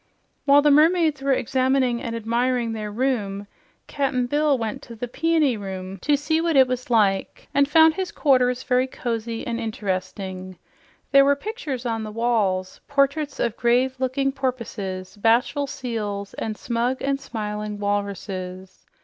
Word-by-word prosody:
While 285 0 +6
the 295 - +5
mermaids 315 -1 +4
were 275 0 +1
examining 255 -1 +1
and 230 -1 -4
admiring 235 +1 0
their 215 -1 -4
room, 205 -5 -1 0.4
Cap'n 265 -3 -1
Bill 290 +2 +2
went 225 -3 -4
to 235 - -11
the 245 +2 -5
Peony 315 0 +1
Room 190 -1 -6
to 290 +8 +2
see 315 +3 0
what 335 -2 0
it 265 -1 +7
was 255 0 -4
like 205 -5 +1
and 280 0 +3
found 320 +1 +6
his 370 +2 -3
quarters 255 -3 +2
were - - -28
very 255 +1 +2
cozy 230 -3 -4
and 235 0 -2
interesting. 185 -3 -4 0.5
There 275 0 +7
were 280 +1 +4
pictures 285 - -5
on 225 -2 -1
the 215 - -5
wall, 215 -5 +1 0.2
portraits 280 +1 0
of 235 -2 0
grave 250 +2 +2
looking 270 +1 0
porpoises, 220 -8 -4
bashful 235 +6 +2
seals, 220 -8 -4
and 215 -1 -4
smug 240 +2 -1
and 275 0 0
smiling 210 -4 -4
walruses. 195 -2 -4
245 Hz, 155 wpm, -23 LUFS, 210-275 Hz, 0.5 s, it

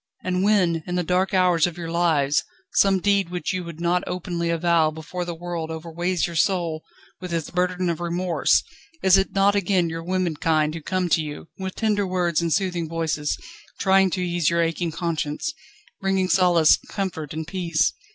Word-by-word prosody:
and 185 0 0
when, 185 -5 +3
in 180 - -2
the 180 - +1
dark 185 +3 +1
hours 180 -3 +3
of 175 -1 -7
your 165 -1 -5
lives, 160 -4 +2 0.3
some 195 -1 +4
deed 200 -2 +2
which 180 +1 -3
you 185 -1 -2
would 170 -2 -9
not 175 +1 +1
openly 175 -1 -3
avow 170 -1 +3
before 160 +3 -6
the 175 -1 -5
world 170 -1 -5
overweights 170 +2 -2
your 170 - -6
soul 165 -2 0 0.4
with 180 -1 -7
its 165 -2 -2
burden 180 0 0
of 170 -1 -1
remorse, 175 0 +1 0.4
is 190 0 +6
it 195 0 +1
not 195 +1 +4
again 190 -3 +1
your 165 0 -4
womenkind 165 -4 0
who 165 - -6
come 185 +3 -1
to 160 -1 +2
you, 150 +1 -7
with 190 -1 -4
tender 210 -3 0
words 175 -3 0
and 170 -1 -1
soothing 175 -3 0
voices, 160 -3 -1 0.4
trying 190 0 +4
to 185 0 -2
ease 175 -3 +1
your 170 0 +2
aching 165 +1 -1
conscience, 165 - -2 0.5
bringing 190 -1 +1
solace, 175 -5 +5
comfort, 175 -7 -4
and 160 +1 -4
peace? 175 -2 0
175 Hz, 180 wpm, -23 LUFS, 165-185 Hz, 0.5 s, is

